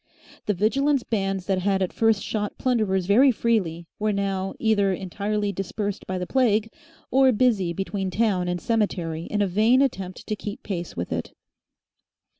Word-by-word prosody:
The 210 - +1
Vigilance 270 +7 +2
bands 195 -4 -2
that 190 -1 +1
had 195 0 +1
at 185 - -3
first 225 -2 +2
shot 210 -2 -3
plunderers 215 -7 +1
very 245 +8 +5
freely 195 -8 0
were 215 0 +1
now 195 -1 -2
either 205 -3 +2
entirely 200 +3 -2
dispersed 200 +1 -4
by 185 - -2
the 180 - -3
plague, 225 -2 +2 0.4
or 265 +1 +5
busy 210 -7 +2
between 195 +2 -3
town 190 -3 +1
and 175 0 -1
cemetery 175 -7 -1
in 210 -1 0
a - - +1
vain 215 +7 +3
attempt 195 -9 -1
to 215 - -2
keep 210 +5 -7
pace 175 -4 -5
with 85 - -4
it. - - -3
205 Hz, 165 wpm, -24 LUFS, 190-225 Hz, 0.4 s, very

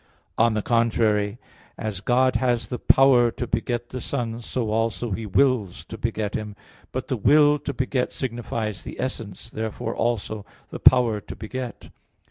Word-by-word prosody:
On 115 -1 +3
the 105 - -1
contrary, 110 -3 +2 0.4
As 105 -4 -4
God 130 +4 +3
has 120 -4 0
the 125 - -4
power 130 -3 +5
to 120 - -4
beget 120 0 -2
the 130 - -5
Son, 120 -3 -3
so 115 -1 -2
also 115 +1 -1
He 110 +3 -3
wills 110 -4 +1
to - - -6
beget 110 -2 -2
Him. 105 -1 -4 0.4
But - - -4
the - - -1
will 150 0 +5
to - - -4
beget 130 -2 -1
signifies 115 -4 -3
the - - -8
essence. 115 -6 -4
Therefore, 110 +1 -4
also, 110 -2 -1 0.3
the - - -6
power 115 -4 +5
to - - -9
beget. 120 +1 -6
115 Hz, 160 wpm, -24 LUFS, 110-125 Hz, 0.4 s, power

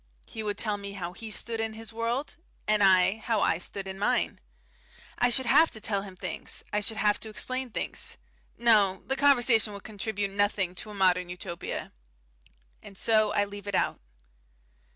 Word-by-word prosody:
He 220 - -7
would 210 -1 -2
tell 210 -2 0
me 200 0 -7
how 180 -3 -5
he 220 +3 -7
stood 225 +2 -1
in 225 0 -2
his 225 0 -8
world, 235 +7 -2 0.3
and 215 0 +3
I 190 +1 +5
how 220 -1 0
I 165 - +2
stood 195 +2 -5
in 190 0 -6
mine. 205 - +1 0.8
I 245 - +4
should 260 +2 +3
have 320 +7 +6
to 220 - -7
tell 210 -2 -1
him 195 -2 -9
things, 185 -2 -4
I 210 - +2
should 215 +1 -2
have 210 -1 +2
to 220 - -7
explain 255 +4 -3
things. - - -3 0.4
No, 210 -5 +4
the 270 - -1
conversation 245 -6 +4
would 200 - -9
contribute 205 -1 -3
nothing 200 -2 +1
to 200 - -8
a 210 - -8
modern 180 -2 +2
Utopia. 175 -1 -5 0.9
And 195 - -13
so 215 -1 +3
I 205 - +2
leave 205 0 -9
it 200 - -1
out. - - +1
210 Hz, 185 wpm, -28 LUFS, 195-225 Hz, 0.9 s, have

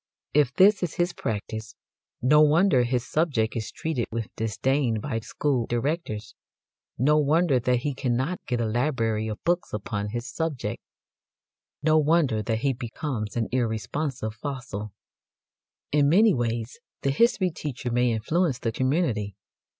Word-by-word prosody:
If 145 -4 +4
this 200 +2 +6
is 180 -3 -2
his 175 0 0
practice, 110 0 -4 0.5
no 150 +4 +6
wonder 155 -1 +5
his 125 0 -1
subject 140 -9 0
is 110 -2 -3
treated 155 -8 -2
with 115 -1 -4
disdain 115 +2 0
by 115 0 -2
school 125 +2 -1
directors, 120 -2 -2 0.6
no 150 +5 +4
wonder 150 -1 +3
that 125 0 +1
he 145 +1 -1
cannot 130 +6 -1
get 120 -1 0
a 115 - +1
library 115 -2 0
of 105 -1 -6
books 175 +1 0
upon 105 0 -3
his 120 +3 -4
subject, 160 -1 -3 1.0
no 155 0 +5
wonder 150 -7 +2
that 110 +1 -2
he 135 0 +2
becomes 120 -2 -4
an 115 - 0
irresponsive 115 +1 -2
fossil. 120 -6 -5 1.0
In 145 -1 +4
many 205 +6 +5
ways 115 -1 -2 0.2
the 140 - +2
history 185 - +3
teacher 135 -5 -5
may 120 0 +2
influence 140 +6 0
the 115 - -2
community. 125 - 0
125 Hz, 140 wpm, -26 LUFS, 115-150 Hz, 1.0 s, this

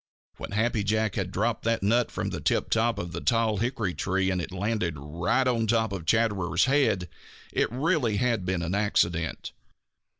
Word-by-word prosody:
When - - -7
Happy 110 0 +1
Jack 110 0 0
had 95 -3 -2
dropped 110 +5 -1
that 115 -3 +1
nut 115 +4 +2
from - - -3
the - - -5
tiptop 115 -1 +1
of 85 -4 -4
the - - -5
tall 115 -3 +2
hickory 110 -4 -1
tree 95 +1 0
and 90 -1 -1
it - - -5
had 95 -1 -7
landed 100 -5 -1
right 85 - 0
on 115 -3 +1
top 110 -2 +1
of 85 -4 -6
Chatterer's 100 -6 +2
head 130 -10 +2 0.5
it - - +1
really 130 - +1
had 115 -3 +1
been 90 -1 -1
an 85 +2 -2
accident. 85 -5 0
105 Hz, 180 wpm, -27 LUFS, 90-115 Hz, 0.5 s, nut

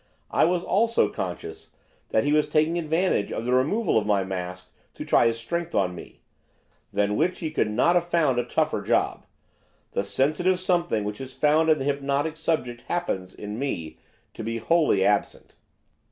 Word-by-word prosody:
I - - +4
was, 175 +1 +1
also, 230 +4 +2
conscious 420 0 -6 0.4
that - - +2
he 145 +1 +1
was 150 0 +3
taking 160 +3 +1
advantage 165 - 0
of 115 - -4
the 125 - +1
removal 155 - +2
of 105 - -5
my 100 -2 +2
mask 90 -1 -6 0.2
to - - -6
try - - +4
his 115 0 0
strength 170 +9 -4
on 90 -2 +1
me, 90 - -12 0.7
than 100 +1 +1
which 175 +7 +1
he 160 -2 -4
could 115 -8 0
not 125 +11 +3
have 175 -1 +1
found 155 -8 +2
a - - +1
tougher - - 0
job. - - 0 0.6
The - - -1
sensitive 155 - +1
something 175 - 0
which 105 +4 -5
is 130 0 -8
found 150 +4 +3
in 155 - +5
the 135 - -4
hypnotic 140 +2 -1
subject 140 -7 -2
happens, 95 - -2
in 105 +2 -6
me, 85 - -4 0.3
to - - -7
be 115 +1 -3
wholly 130 - +2
absent. 105 -1 0
140 Hz, 180 wpm, -25 LUFS, 105-170 Hz, 0.7 s, in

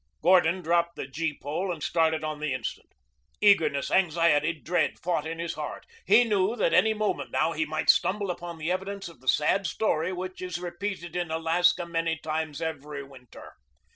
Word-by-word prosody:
Gordon 180 0 +4
dropped 170 +1 +1
the - - -5
gee 150 +2 -3
pole 175 +6 -3
and 160 -4 -5
started 160 -1 +1
on 155 -1 -3
the 150 -3 -1
instant. 125 -4 -6 0.5
Eagerness, 165 -9 +3
anxiety, 165 -4 +3
dread 170 +2 -1
fought 165 -3 -2
in 165 +1 -5
his 170 0 -3
heart. - - -6 0.2
He 245 - +7
knew 210 -1 +1
that 205 -7 +1
any 220 0 +4
moment 215 0 -1
now 165 - +1
he 160 -1 -1
might 155 +1 -3
stumble 195 +1 -1
upon 175 -1 -7
the 160 +2 -2
evidence 195 +1 -3
of 170 -5 -13
the 130 - -19
sad 175 +8 +2
story 170 -5 0
which 185 0 -6
is 180 -2 -4
repeated 175 -1 -5
in 175 -2 -2
Alaska 165 +2 +2
many 165 -1 -1
times 155 0 -3
every 150 -2 -5
winter. 130 -3 -14
170 Hz, 180 wpm, -27 LUFS, 155-180 Hz, 0.5 s, He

